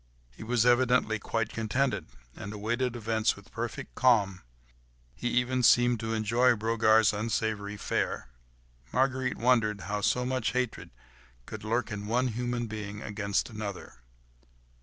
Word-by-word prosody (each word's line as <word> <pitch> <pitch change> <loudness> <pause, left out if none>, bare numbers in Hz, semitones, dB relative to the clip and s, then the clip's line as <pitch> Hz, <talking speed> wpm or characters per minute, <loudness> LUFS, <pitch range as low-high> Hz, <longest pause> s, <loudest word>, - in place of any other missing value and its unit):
He - - -15
was 120 +1 +1
evidently 125 -3 +3
quite 115 +1 -2
contented, 110 -3 -1 0.3
and 105 -1 -7
awaited 120 +4 -1
events 110 -1 0
with 100 +2 -16
perfect 120 +4 -5
calm; 100 -8 +3 0.7
he 120 - -4
even 125 +1 +1
seemed 120 -1 +5
to 115 0 -2
enjoy 115 +3 +3
Brogard's 110 0 +3
unsavoury 105 -1 -2
fare. - - -2 0.6
Marguerite 130 -1 0
wondered 115 -4 +2
how 105 +3 -3
so 125 +4 +1
much 130 -3 -1
hatred 125 -2 -2 0.6
could 110 +6 -8
lurk 115 +2 -1
in 105 -1 -5
one 125 +3 +1
human 120 +1 -2
being 105 -1 -6
against 100 +1 -2
another. 100 - -7
115 Hz, 135 wpm, -29 LUFS, 105-125 Hz, 0.7 s, seemed